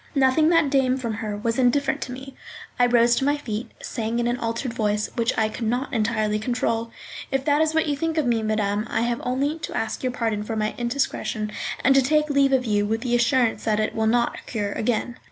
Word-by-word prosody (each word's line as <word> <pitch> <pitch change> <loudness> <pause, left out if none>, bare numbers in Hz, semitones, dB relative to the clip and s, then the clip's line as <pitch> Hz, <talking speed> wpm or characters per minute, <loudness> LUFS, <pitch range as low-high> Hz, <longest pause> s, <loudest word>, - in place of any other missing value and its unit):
Nothing 275 +4 +4
that 330 -5 +3
came 265 -2 +2
from 235 -4 -3
her 210 -1 -4
was 230 +3 -1
indifferent 260 +3 +2
to 255 - -4
me. 265 +2 -8 0.5
I 245 - +5
rose 240 0 +4
to - - 0
my 290 +2 +2
feet, 225 -5 -5
saying 225 0 -3
in 240 - 0
an 240 +1 0
altered 230 +2 -3
voice, 210 -1 -1
which 235 0 +1
I 220 - +3
could 220 +1 -4
not 250 +5 -1
entirely 215 -2 0
control: 230 0 -1 0.4
"If 270 0 -1
that 295 0 +3
is 315 0 +1
what 320 - +3
you 295 -2 0
think 325 +2 -2
of 310 - +2
me, 235 -2 +1
madame, 215 0 -1
I - - 0
have 235 0 -1
only 280 +5 -1
to - - -5
ask 220 -1 -2
your 255 - -1
pardon 225 -4 -1
for 220 +2 -4
my 215 0 -1
indiscretion, 235 -3 -2 0.3
and 270 - +5
to 270 - +5
take 300 +3 +2
leave 280 -1 +3
of 260 -1 +2
you 205 -2 +1
with 220 +2 -1
the 245 -1 -2
assurance 240 -1 +2
that 215 -1 +1
it 215 - 0
shall 220 0 0
not 235 +1 +1
occur 205 -4 -4
again." 240 +3 -2
240 Hz, 230 wpm, -24 LUFS, 220-270 Hz, 0.5 s, I